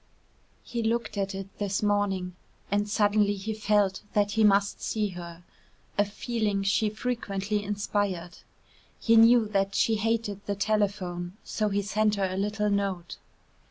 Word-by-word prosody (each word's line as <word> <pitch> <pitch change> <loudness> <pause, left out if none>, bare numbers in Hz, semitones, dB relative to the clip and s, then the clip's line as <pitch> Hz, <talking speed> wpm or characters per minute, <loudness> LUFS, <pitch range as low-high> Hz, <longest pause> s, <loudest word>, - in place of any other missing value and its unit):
He 235 - -3
looked 230 0 -1
at 195 -1 -2
it 195 0 -5
this 200 0 -1
morning, 195 -3 0 0.4
and 205 +1 +1
suddenly 205 -1 +2
he 205 +3 -4
felt 205 -2 +1
that 205 -1 +2
he 220 +1 +2
must 200 -1 +3
see 215 -2 -1
her 175 -1 -9 0.5
a 205 - +3
feeling 210 -1 -2
she 210 +2 +2
frequently 210 -3 -2
inspired. 200 -3 -2 0.6
He 230 - +3
knew 230 0 +7
that 195 -1 0
she 225 -1 +2
hated 215 -2 -1
the 200 - -1
telephone, 200 -3 -1
so 215 -1 -1
he 200 0 0
sent 210 +1 +1
her 200 -1 0
a 185 0 -3
little 210 +1 0
note. 195 -4 -2
205 Hz, 150 wpm, -27 LUFS, 195-215 Hz, 0.6 s, knew